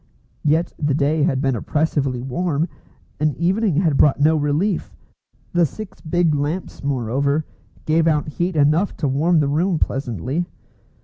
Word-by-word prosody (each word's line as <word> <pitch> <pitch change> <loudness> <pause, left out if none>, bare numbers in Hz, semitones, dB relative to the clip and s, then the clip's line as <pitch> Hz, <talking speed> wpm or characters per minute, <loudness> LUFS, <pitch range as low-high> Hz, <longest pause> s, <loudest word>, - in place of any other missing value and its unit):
Yet 155 +3 +1
the 145 -2 +1
day 150 +1 +1
had 140 -4 +1
been 135 -2 +1
oppressively 135 -1 -1
warm, 155 +3 -1 0.5
and 150 -1 +1
evening 190 +2 +1
had 160 -4 +2
brought 145 -2 +4
no 155 +2 +4
relief. 155 +6 -1 0.6
The 175 0 +4
six 200 +7 -5
big 170 -1 +1
lamps, 150 +5 -3
moreover, 140 +3 0 0.4
gave 160 +1 +2
out 150 -2 +1
heat 175 +4 -2
enough 155 +6 +2
to 150 - -1
warm 155 +5 +2
the 145 - +1
room 165 +5 +1
pleasantly. 135 - -2
150 Hz, 145 wpm, -21 LUFS, 140-170 Hz, 0.6 s, brought